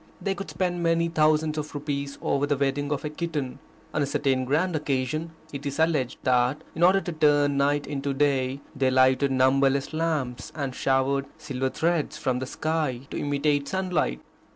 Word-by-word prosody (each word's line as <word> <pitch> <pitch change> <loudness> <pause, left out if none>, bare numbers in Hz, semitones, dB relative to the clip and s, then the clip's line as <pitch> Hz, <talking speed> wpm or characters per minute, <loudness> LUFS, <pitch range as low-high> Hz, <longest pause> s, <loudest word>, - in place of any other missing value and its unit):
They 195 - -1
could 195 0 -7
spend 175 -2 -1
many 165 0 +2
thousands 155 -1 +2
of 150 0 -6
rupees 140 -1 -3
over 140 +1 +1
the 145 -1 +1
wedding 140 +1 0
of 145 +1 -2
a - - -1
kitten. 150 -5 -3 0.3
On 150 - 0
a 140 - +1
certain 135 -2 +1
grand 160 +6 +1
occasion 150 +2 -1 0.2
it 140 0 -5
is 140 - -4
alleged 160 -6 +1
that 125 +2 +2
in 160 - -6
order 185 +3 +6
to 175 - -4
turn 145 -3 +3
night 145 +1 +2
into 140 -1 -3
day 135 -1 +1
they 135 -1 +2
lighted 130 +2 +4
numberless 135 +2 +2
lamps 155 -6 -2
and 140 -4 -3
showered 135 +1 +1
silver 135 -4 -2
threads 165 +1 0
from 130 -1 -1
the 130 - -4
sky 155 -5 -1
to - - -3
imitate 145 0 0
sunlight. 180 - -1
145 Hz, 175 wpm, -26 LUFS, 135-155 Hz, 0.3 s, order